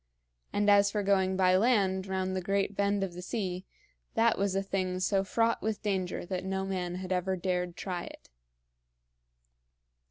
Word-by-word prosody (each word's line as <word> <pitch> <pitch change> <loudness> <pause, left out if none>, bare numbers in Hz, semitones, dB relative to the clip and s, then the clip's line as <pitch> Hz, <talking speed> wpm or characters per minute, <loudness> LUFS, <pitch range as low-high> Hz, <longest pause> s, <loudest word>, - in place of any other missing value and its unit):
And 205 0 +1
as 200 0 +6
for 205 0 -1
going 190 -1 +2
by 185 -1 +4
land 195 -3 +2
round 190 0 -1
the 185 - -1
great 195 +2 0
bend 200 0 +1
of 185 -3 -3
the 180 - -7
sea, 185 -2 -3 0.5
that 230 0 +4
was 200 -1 0
a 195 - +1
thing 185 -2 -2
so 195 +1 +2
fraught 230 +4 +1
with 220 0 -2
danger 190 -4 -1
that 185 0 -3
no 190 0 -2
man 180 -2 -3
had 185 0 -6
ever 185 +1 0
dared 180 -1 -2
try 180 -3 -4
it. - - -13
190 Hz, 170 wpm, -30 LUFS, 185-200 Hz, 0.5 s, as